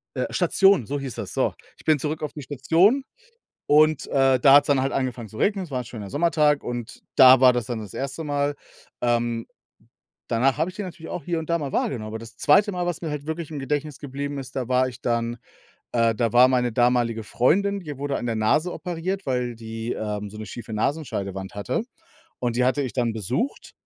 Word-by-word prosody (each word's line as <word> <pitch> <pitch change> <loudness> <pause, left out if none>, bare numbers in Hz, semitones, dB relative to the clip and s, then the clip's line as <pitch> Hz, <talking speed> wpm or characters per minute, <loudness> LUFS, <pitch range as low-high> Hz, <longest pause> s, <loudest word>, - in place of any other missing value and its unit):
Äh, - - -1
Station, 195 - +3
so 145 +4 -2
hieß 135 -4 -5
das, - - -6
so. - - +1 0.2
Ich - - -18
bin 155 -2 +3
zurück 150 +3 -3
auf 150 - -3
die 150 - -8
Station 165 - +2 0.6
und, 155 0 +4
äh, 135 -1 +3
da 135 +1 +7
hat‘s 145 0 +7
dann 140 -2 +3
halt 135 - -1
angefangen 125 -4 -2
zu 110 - -11
regnen. 200 -2 +1
Es 155 - -12
war 130 -2 -2
'n - - -6
schöner 105 -5 -8
Sommertag 150 -1 +2
und 120 -1 -5 0.2
da 130 -1 +9
war 130 -1 +7
das 120 -2 -2
dann 120 -2 -3
das 105 -3 -9
1. 140 +4 -4
Mal, 145 0 -1 0.5
ähm, 120 -1 0 0.8
danach 130 +4 +2
habe 160 +4 0
ich 185 - -12
den 205 -2 -4
natürlich 165 -2 -9
auch 175 - -5
hier 170 -2 -1
und 160 +1 -8
da 170 - +2
mal 140 -4 -4
wahrgenommen. 110 -5 -1
Aber, 110 +1 -5
das 115 +2 -12
2. 205 +8 +4
Mal, 180 -1 -2
was 175 0 -3
mir 160 - -3
halt 150 -1 -5
wirklich 160 -1 -4
im 145 - -4
Gedächtnis 145 +1 -3
geblieben 145 0 -5
ist, 130 0 -9
da 125 -3 -2
war 130 0 +2
ich 125 0 -9
dann, 115 0 -1 0.6
äh 115 -1 +3
da 115 +1 0
war 125 +1 +7
meine 125 -2 +1
damalige 120 -1 +2
Freundin 195 - +1
die 150 -5 -8
wurde 140 0 -2
an 120 - -4
der 115 - -1
Nase 150 +11 +2
operiert, 180 +2 -4
weil 125 -2 -1
die, 115 +1 -5
ähm, 105 -1 -4
so 105 - -10
'ne 110 - -6
schiefe 115 +1 -8
Nasenscheidewand 100 -7 -3
hatte 105 - -2 0.6
und 120 -1 -1
die 125 - +3
hatte 130 +3 +2
ich 130 - -4
dann 120 -3 0
besucht. 120 - -3
130 Hz, 220 wpm, -24 LUFS, 120-155 Hz, 0.8 s, da